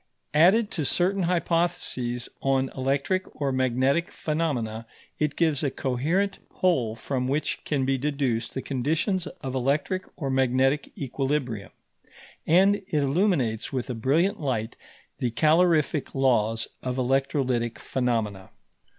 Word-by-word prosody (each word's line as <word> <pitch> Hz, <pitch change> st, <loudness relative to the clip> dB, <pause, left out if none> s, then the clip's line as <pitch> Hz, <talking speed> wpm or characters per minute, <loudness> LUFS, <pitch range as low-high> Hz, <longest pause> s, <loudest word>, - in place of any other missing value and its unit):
Added 190 Hz, +8 st, +5 dB
to 160 Hz, -, -2 dB
certain 185 Hz, +7 st, +1 dB
hypotheses 165 Hz, -9 st, 0 dB
on 135 Hz, -1 st, +1 dB
electric 140 Hz, +9 st, -1 dB
or 140 Hz, -2 st, 0 dB
magnetic 130 Hz, +5 st, +1 dB
phenomena, 125 Hz, -9 st, -2 dB, 0.3 s
it 150 Hz, -1 st, 0 dB
gives 160 Hz, -5 st, +2 dB
a 140 Hz, -, +2 dB
coherent 155 Hz, +11 st, -1 dB
whole 130 Hz, -12 st, +1 dB
from 125 Hz, +1 st, -2 dB
which 150 Hz, +3 st, -1 dB
can 140 Hz, -3 st, 0 dB
be 135 Hz, 0 st, +1 dB
deduced 135 Hz, -5 st, -1 dB
the 130 Hz, -, -3 dB
conditions 160 Hz, -, 0 dB
of 130 Hz, -1 st, -7 dB
electric 145 Hz, +8 st, 0 dB
or 140 Hz, -5 st, -3 dB
magnetic 130 Hz, +2 st, +2 dB
equilibrium; 135 Hz, -5 st, -2 dB, 0.8 s
and 195 Hz, +5 st, +5 dB
it 200 Hz, 0 st, -17 dB
illuminates 145 Hz, -, +1 dB
with 130 Hz, -1 st, -3 dB
a -, -, -2 dB
brilliant 145 Hz, -, +1 dB
light 120 Hz, -6 st, -2 dB, 0.4 s
the 125 Hz, -, 0 dB
calorific 155 Hz, +1 st, +2 dB
laws 115 Hz, -4 st, +2 dB
of 125 Hz, 0 st, -3 dB
electrolytic 130 Hz, -2 st, 0 dB
phenomena. 110 Hz, -7 st, -2 dB
135 Hz, 125 wpm, -26 LUFS, 125-160 Hz, 0.8 s, Added